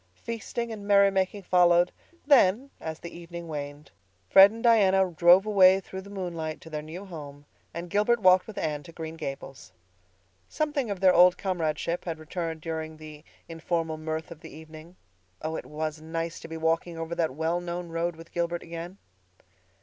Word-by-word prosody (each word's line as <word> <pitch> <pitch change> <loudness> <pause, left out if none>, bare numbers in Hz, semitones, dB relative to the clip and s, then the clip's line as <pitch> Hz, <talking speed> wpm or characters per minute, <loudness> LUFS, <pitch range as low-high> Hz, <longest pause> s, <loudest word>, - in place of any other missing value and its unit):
Feasting 230 - -5
and 205 -2 -7
merry 200 -1 +5
making 195 +1 -1
followed; 175 -1 +4 0.3
then, 265 -2 +4
as 160 -1 -5
the 170 - -10
evening 170 0 -8
waned, 145 -1 -7 0.4
Fred 195 - +9
and 225 +2 -9
Diana 195 -5 +4
drove 175 +4 +5
away 190 -3 +6
through 190 0 -8
the 200 - -13
moonlight 170 -5 -5
to 160 - -13
their 150 -1 -3
new 165 +6 -9
home, 145 -5 -10 0.3
and 170 +1 -6
Gilbert 210 +6 +2
walked 185 -2 +5
with 220 - -10
Anne 150 -2 -2
to 165 - -13
Green 160 -1 -7
Gables. 135 -3 -7 0.8
Something 295 -6 -1
of 195 -2 -4
their 185 -1 +6
old 180 +1 +6
comradeship 170 -2 -2
had 165 -2 -3
returned 160 0 -5
during 160 -1 -5
the 155 -1 -11 0.2
informal 165 -1 -3
mirth 160 +1 -4
of 165 - -10
the - - -11
evening. 155 +3 -13 0.5
Oh, 160 +1 -2
it - - -6
was 155 0 -4
nice 165 +1 -4
to - - -10
be 165 0 -6
walking 165 +1 -1
over 165 +1 -4
that 160 -6 -1
well 165 +3 -1
known 175 0 -5
road 165 +1 -2
with 165 +1 -14
Gilbert 170 0 -2
again! 170 +3 -8
170 Hz, 180 wpm, -27 LUFS, 160-190 Hz, 0.8 s, Fred